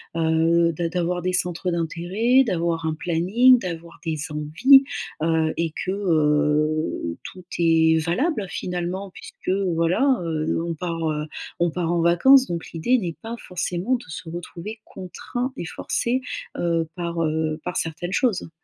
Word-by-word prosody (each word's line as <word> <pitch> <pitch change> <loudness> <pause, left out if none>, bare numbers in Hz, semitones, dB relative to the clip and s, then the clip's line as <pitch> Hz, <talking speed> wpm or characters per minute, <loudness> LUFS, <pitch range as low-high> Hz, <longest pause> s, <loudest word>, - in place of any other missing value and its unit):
heu 165 +1 +3
d'a 165 +1 -2
d'avoir 175 0 -1
des 185 +1 -1
centres 180 0 -1
d'intérêt, 180 +9 +2
d'avoir 170 -6 -1
un 155 - -1
planning, 195 +11 +4
d'avoir 170 -3 -7
des 160 -2 -2
envies, 165 - +5 0.4
heu. 160 -1 +1
Et 165 -2 -1
que, 185 - -1
heu, 150 - +1
tout 185 -1 -10
est 160 -1 +4
valable, 215 - 0
finalement. 180 +2 -4
Puisque - - -9 0.3
voilà, 185 +11 +3
heu, 160 -1 -1
on 170 - -1
part, 165 0 -3
heu, 150 0 -3 0.3
on 175 - +3
part 170 0 -2
en 175 - +1
vacances, 255 +11 +6
donc 170 -1 -4
l'idée 235 +10 +2
n'est 175 -8 -4
pas 230 +1 -5
forcément 180 +5 -2
de 245 - -7
se 160 +1 -7
retrouver 175 +5 -7
contraint 245 +7 -5
et - - -4
forcé, 235 +9 -1 0.4
heu, 165 -1 0
par, 170 -1 -3
heu, 155 0 -1
par 180 - -3
certaines 170 +3 -3
choses. 225 -10 +1
170 Hz, 150 wpm, -23 LUFS, 160-185 Hz, 0.4 s, vacances